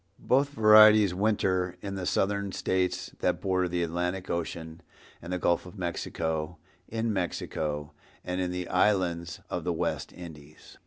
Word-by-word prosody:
Both 140 Hz, +2 st, +2 dB
varieties 110 Hz, -5 st, +7 dB
winter 95 Hz, -3 st, 0 dB
in 100 Hz, +1 st, -6 dB
the 95 Hz, -2 st, -4 dB
Southern 100 Hz, 0 st, 0 dB
States 90 Hz, -1 st, -1 dB
that -, -, 0 dB
border 95 Hz, -1 st, 0 dB
the 85 Hz, 0 st, -1 dB
Atlantic 90 Hz, +3 st, -2 dB
ocean 85 Hz, -1 st, -4 dB, 0.4 s
and 85 Hz, -, -8 dB
the 90 Hz, -, 0 dB
Gulf 85 Hz, 0 st, +1 dB
of 90 Hz, -, -12 dB
Mexico, 80 Hz, -2 st, -3 dB, 0.3 s
in 115 Hz, 0 st, -1 dB
Mexico 75 Hz, -5 st, -3 dB, 0.3 s
and 90 Hz, +1 st, -2 dB
in 90 Hz, -, -1 dB
the 90 Hz, -1 st, -4 dB
islands 90 Hz, -3 st, +1 dB
of 90 Hz, -, -2 dB
the 90 Hz, -, -1 dB
West 80 Hz, -, -2 dB
Indies. 75 Hz, -4 st, -12 dB
90 Hz, 150 wpm, -28 LUFS, 85-100 Hz, 0.4 s, varieties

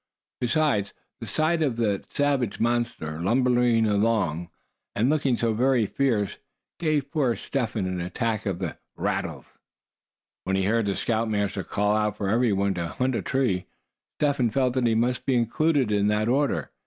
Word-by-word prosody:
Besides, 120 Hz, -5 st, +1 dB, 0.2 s
the -, -, -7 dB
sight 160 Hz, +1 st, +1 dB
of 140 Hz, -6 st, +1 dB
that 105 Hz, -4 st, -1 dB
savage 140 Hz, -6 st, 0 dB
monster 115 Hz, -10 st, -1 dB
lumbering 120 Hz, +2 st, +3 dB
along, 100 Hz, -6 st, +1 dB, 0.5 s
and 120 Hz, +6 st, +2 dB
looking 140 Hz, -5 st, +1 dB
so 115 Hz, -1 st, +1 dB
very 125 Hz, 0 st, +2 dB
fierce, 110 Hz, -4 st, 0 dB, 0.4 s
gave 150 Hz, -4 st, 0 dB
poor 135 Hz, -7 st, +1 dB
Step 125 Hz, -6 st, -3 dB
Hen 105 Hz, -4 st, -1 dB
an 90 Hz, -1 st, -2 dB
attack 110 Hz, +4 st, -2 dB
of 95 Hz, -3 st, -1 dB
the 90 Hz, -3 st, -5 dB, 0.2 s
"rattles." -, -, -4 dB, 0.8 s
When 95 Hz, -, -1 dB
he 95 Hz, -, +1 dB
heard 110 Hz, +2 st, +1 dB
the 100 Hz, -, 0 dB
scoutmaster 105 Hz, -4 st, -1 dB
call 105 Hz, +4 st, 0 dB
out 105 Hz, -1 st, 0 dB
for 100 Hz, -2 st, -2 dB
every 115 Hz, +2 st, +2 dB
one 100 Hz, 0 st, +1 dB
to 85 Hz, -2 st, -3 dB
hunt 130 Hz, +8 st, -1 dB
a -, -, -1 dB
tree, 120 Hz, -9 st, 0 dB, 0.5 s
Step 145 Hz, -1 st, +1 dB
Hen 125 Hz, -4 st, +2 dB
felt 130 Hz, +2 st, +1 dB
that 125 Hz, -2 st, +1 dB
he 115 Hz, -, +2 dB
must 120 Hz, +2 st, 0 dB
be 135 Hz, -, +3 dB
included 130 Hz, +2 st, +1 dB
in 105 Hz, 0 st, +2 dB
that 105 Hz, +1 st, +1 dB
order. 140 Hz, +4 st, 0 dB
115 Hz, 170 wpm, -25 LUFS, 100-130 Hz, 0.8 s, lumbering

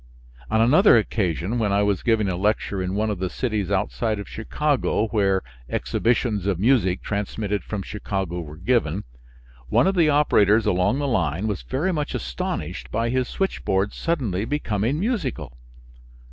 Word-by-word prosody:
On 110 Hz, -, +2 dB
another 135 Hz, -, +6 dB
occasion, 100 Hz, 0 st, -1 dB
when 105 Hz, -3 st, +1 dB
I 100 Hz, +1 st, +3 dB
was 100 Hz, -2 st, +1 dB
giving 110 Hz, -3 st, +2 dB
a 95 Hz, -, -1 dB
lecture 100 Hz, 0 st, 0 dB
in 90 Hz, +1 st, -2 dB
one 110 Hz, +1 st, 0 dB
of 100 Hz, -, -4 dB
the 95 Hz, 0 st, -1 dB
cities 110 Hz, -6 st, -2 dB
outside 105 Hz, +2 st, 0 dB
of 100 Hz, -, -6 dB
Chicago, 125 Hz, -2 st, -1 dB
where 100 Hz, -3 st, +1 dB, 0.3 s
exhibitions 110 Hz, -4 st, 0 dB
of 100 Hz, -4 st, +1 dB
music 100 Hz, -3 st, +2 dB
transmitted 105 Hz, 0 st, -2 dB
from 105 Hz, -3 st, -4 dB
Chicago 95 Hz, -4 st, -3 dB
were 75 Hz, -1 st, -9 dB
given, 95 Hz, -2 st, 0 dB, 0.7 s
one -, -, +4 dB
of 190 Hz, -, +3 dB
the 170 Hz, -5 st, +3 dB
operators 110 Hz, -7 st, +4 dB
along 90 Hz, +7 st, +2 dB
the 145 Hz, 0 st, -1 dB
line 95 Hz, -, 0 dB
was 105 Hz, -4 st, -2 dB
very 160 Hz, +9 st, -1 dB
much 150 Hz, -3 st, -2 dB
astonished 60 Hz, 0 st, -4 dB
by 115 Hz, +2 st, -1 dB
his 130 Hz, 0 st, 0 dB
switchboard 100 Hz, -, -1 dB
suddenly 125 Hz, -, -1 dB
becoming 115 Hz, 0 st, -1 dB
musical. 140 Hz, -, -2 dB
105 Hz, 160 wpm, -23 LUFS, 95-125 Hz, 0.7 s, another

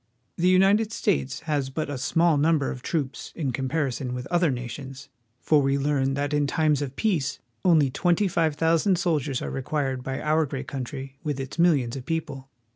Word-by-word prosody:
The 175 Hz, -, +1 dB
United 195 Hz, +4 st, +4 dB
States 160 Hz, -, -1 dB
has 145 Hz, -4 st, -1 dB
but 155 Hz, +3 st, -3 dB
a 145 Hz, -, -4 dB
small 165 Hz, +4 st, +3 dB
number 150 Hz, -1 st, +2 dB
of 125 Hz, -, -7 dB
troops 145 Hz, -2 st, -3 dB
in 145 Hz, -6 st, -2 dB
comparison 130 Hz, -1 st, -2 dB
with 125 Hz, 0 st, -5 dB
other 175 Hz, -2 st, +3 dB
nations, 135 Hz, +2 st, -6 dB, 0.3 s
for 150 Hz, -2 st, +3 dB
we 135 Hz, 0 st, +1 dB
learn 135 Hz, -1 st, +1 dB
that 145 Hz, +1 st, -2 dB
in 145 Hz, -1 st, +2 dB
times 150 Hz, -1 st, +1 dB
of 135 Hz, -2 st, -4 dB
peace 160 Hz, -8 st, 0 dB, 0.3 s
only 155 Hz, -7 st, +4 dB
twenty 175 Hz, +7 st, +2 dB
five 165 Hz, -4 st, +1 dB
thousand 165 Hz, +4 st, +2 dB
soldiers 155 Hz, -7 st, 0 dB
are -, -, -4 dB
required 135 Hz, -1 st, -2 dB
by 135 Hz, +1 st, -4 dB
our 155 Hz, 0 st, +1 dB
great 135 Hz, -1 st, -5 dB
country 135 Hz, +1 st, -6 dB
with 145 Hz, -4 st, -2 dB
its 135 Hz, +5 st, -6 dB
millions 140 Hz, -8 st, +3 dB
of 130 Hz, -1 st, -8 dB
peo 165 Hz, -1 st, +1 dB
ple. 135 Hz, -3 st, -10 dB
145 Hz, 190 wpm, -25 LUFS, 135-165 Hz, 0.3 s, United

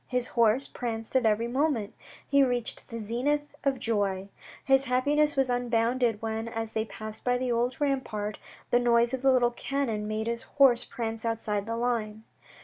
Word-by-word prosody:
His 250 Hz, 0 st, -1 dB
horse 235 Hz, +3 st, +2 dB
pranced 225 Hz, -1 st, -5 dB
at 255 Hz, -3 st, +4 dB
every 220 Hz, +2 st, +1 dB
moment. 255 Hz, -4 st, 0 dB, 0.3 s
He 280 Hz, 0 st, +4 dB
reached 245 Hz, -3 st, -2 dB
the 230 Hz, -, -5 dB
zenith 260 Hz, +7 st, -1 dB
of 275 Hz, -1 st, +1 dB
joy. 200 Hz, -4 st, 0 dB, 0.4 s
His 270 Hz, 0 st, +4 dB
happiness 290 Hz, +4 st, +2 dB
was 270 Hz, -1 st, +2 dB
unbounded 240 Hz, -2 st, +1 dB
when, 225 Hz, 0 st, -2 dB
as 225 Hz, -1 st, -4 dB
they 220 Hz, 0 st, 0 dB
passed 215 Hz, +1 st, -8 dB
by 245 Hz, 0 st, +2 dB
the 250 Hz, 0 st, -1 dB
old 240 Hz, +2 st, 0 dB
rampart, 245 Hz, -8 st, -2 dB, 0.3 s
the 245 Hz, -, +5 dB
noise 235 Hz, 0 st, +3 dB
of 260 Hz, -, -2 dB
the 270 Hz, 0 st, +4 dB
little 245 Hz, -2 st, +3 dB
cannon 240 Hz, -5 st, -2 dB
made 215 Hz, +1 st, -2 dB
his 235 Hz, 0 st, -2 dB
horse 265 Hz, -4 st, +4 dB
prance 225 Hz, -1 st, -5 dB
outside 220 Hz, -3 st, -1 dB
the 230 Hz, 0 st, -2 dB
line. 220 Hz, -3 st, -2 dB
235 Hz, 175 wpm, -28 LUFS, 220-255 Hz, 0.4 s, the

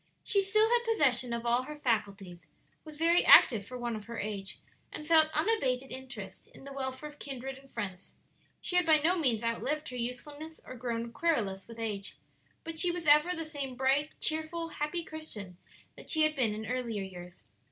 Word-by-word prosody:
She 400 Hz, -, +4 dB
still 430 Hz, +3 st, +3 dB
had 475 Hz, +1 st, +2 dB
possession 270 Hz, -, +2 dB
of 235 Hz, 0 st, -3 dB
all 240 Hz, +1 st, +3 dB
her 300 Hz, +4 st, -8 dB
faculties, 200 Hz, -, -2 dB, 0.4 s
was 310 Hz, -2 st, -11 dB
very 335 Hz, +2 st, +4 dB
active 210 Hz, -5 st, +7 dB
for 250 Hz, -, -7 dB
one 240 Hz, -2 st, -3 dB
of 210 Hz, -1 st, -8 dB
her 235 Hz, 0 st, -7 dB
age, 200 Hz, -2 st, -4 dB, 0.3 s
and 300 Hz, -, -7 dB
felt 320 Hz, -1 st, +7 dB
unabated 270 Hz, -, 0 dB
interest 255 Hz, -7 st, -8 dB
in -, -, -16 dB
the 275 Hz, 0 st, -9 dB
welfare 265 Hz, +2 st, -4 dB
of 295 Hz, 0 st, -14 dB
kindred 270 Hz, -1 st, -6 dB
and 270 Hz, 0 st, -20 dB
friends. 195 Hz, -5 st, -6 dB, 0.5 s
She 360 Hz, -, +1 dB
had 360 Hz, -, +4 dB
by 315 Hz, -1 st, +7 dB
no 325 Hz, +5 st, +2 dB
means 240 Hz, -7 st, +1 dB
outlived 285 Hz, +6 st, -2 dB
her 250 Hz, -, -7 dB
usefulness 290 Hz, +6 st, -6 dB
or -, -, -8 dB
grown 235 Hz, -1 st, -4 dB
querulous 210 Hz, -, -1 dB
with 230 Hz, 0 st, -11 dB
age, 210 Hz, -3 st, -4 dB, 0.5 s
but 325 Hz, 0 st, -1 dB
was 345 Hz, -1 st, -5 dB
ever 300 Hz, +4 st, +5 dB
the 325 Hz, -1 st, -3 dB
same 280 Hz, -4 st, -5 dB
bright, 270 Hz, +3 st, +1 dB
cheerful, 315 Hz, +1 st, -1 dB
happy 325 Hz, +3 st, -3 dB
Christian 225 Hz, -, -8 dB, 0.4 s
that -, -, -13 dB
she 315 Hz, -1 st, +4 dB
had 310 Hz, 0 st, +3 dB
been 230 Hz, -6 st, +1 dB
in 220 Hz, +1 st, -5 dB
earlier 230 Hz, -3 st, -3 dB
years. 180 Hz, -, -10 dB
265 Hz, 190 wpm, -31 LUFS, 230-310 Hz, 0.5 s, active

